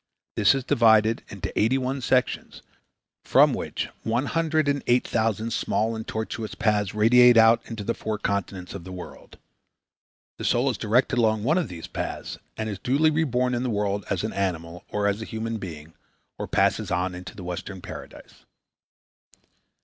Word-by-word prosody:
This 105 +4 +4
is 135 - -2
divided 110 -2 +4
into - - -6
eighty 115 +5 +3
one 130 +1 -2
sections 125 0 0 0.6
from - - +5
which - - -3
one 120 +4 0
hundred 160 -1 +1
and 140 -1 +1
eight 125 +1 +3
thousand 110 0 0
small 110 +2 0
and 110 0 -6
tortuous 110 0 -4
paths 105 -3 0
radiate 120 +2 +6
out 115 +1 +6
into 115 -3 -5
the 115 - -1
four 110 -2 -3
continents 100 -3 -3
of 100 - -7
the 95 - -9
world. 90 -1 -10 1.0
The - - -5
soul 125 +3 +2
is 110 - -7
directed 120 +3 +2
along 110 -2 +2
one 155 +9 +3
of 175 - -2
these 85 -2 -8
paths - - -5 0.2
and 110 - -2
is 100 -3 -5
duly 145 +5 +2
reborn 125 -5 +1
in 120 - 0
the 125 - -1
world 100 -2 -1
as 100 -2 -1
an 110 - -3
animal 90 -3 -3
or 105 -1 -1
as 100 +1 0
a - - -4
human 110 0 -4
being 80 -4 -8 0.5
or - - -3
passes - - +1
on 90 +1 -1
into 90 +1 -9
the 95 - -9
Western 90 +2 -6
Paradise. - - -11
110 Hz, 175 wpm, -25 LUFS, 100-125 Hz, 1.0 s, radiate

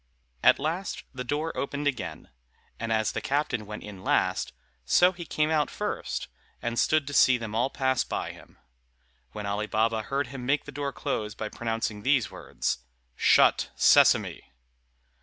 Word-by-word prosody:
At - - +6
last 165 +7 -3
the 125 -1 -4
door 150 +5 -2
opened 145 +1 -3
again, 145 -3 -3 0.5
and 115 0 -3
as 110 -1 +1
the - - -3
captain 140 -7 -1
went 105 0 -7
in 100 -3 -10
last, - - +1 0.3
so 180 - +5
he 175 -2 -8
came 155 0 0
out 150 -2 +2
first, - - -3 0.3
and 120 0 -2
stood 155 -2 +3
to 145 - -6
see 130 -2 +6
them 115 -2 -6
all 120 +4 +1
pass 130 -2 +1
by - - -3
him; - - -16 0.8
when 105 - -5
Ali 105 +1 -2
Baba 110 +1 +1
heard 140 +5 -1
him 130 -2 -7
make 140 +4 +1
the 145 - -8
door 140 0 -3
close 105 -5 -3
by 110 -1 -4
pronouncing 115 -2 -3
these 130 -2 +2
words, - - -3 0.4
"Shut, - - +4
Sesame!" - - +4
130 Hz, 165 wpm, -27 LUFS, 110-145 Hz, 0.8 s, At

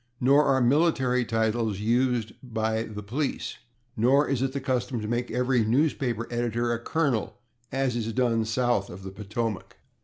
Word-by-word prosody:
Nor 140 +4 +5
are 135 -2 +3
military 130 -2 +3
titles 110 -2 0
used 120 0 +1
by 110 -2 -1
the 105 -2 -6
police. 130 +8 -3 0.4
Nor 130 +6 +3
is 135 -3 0
it 135 0 0
the 140 - -3
custom 125 -2 -1
to 105 - -4
make 120 +2 -1
every 125 0 +1
newspaper 120 -1 0
editor 120 0 0
a 115 - -2
colonel, 130 -4 -1 0.3
as 135 -2 0
is 115 -1 -2
done 115 -2 +1
south 115 -3 0
of 95 +2 -9
the 95 - -7
Potomac. 105 +1 -4
120 Hz, 160 wpm, -27 LUFS, 110-130 Hz, 0.4 s, Nor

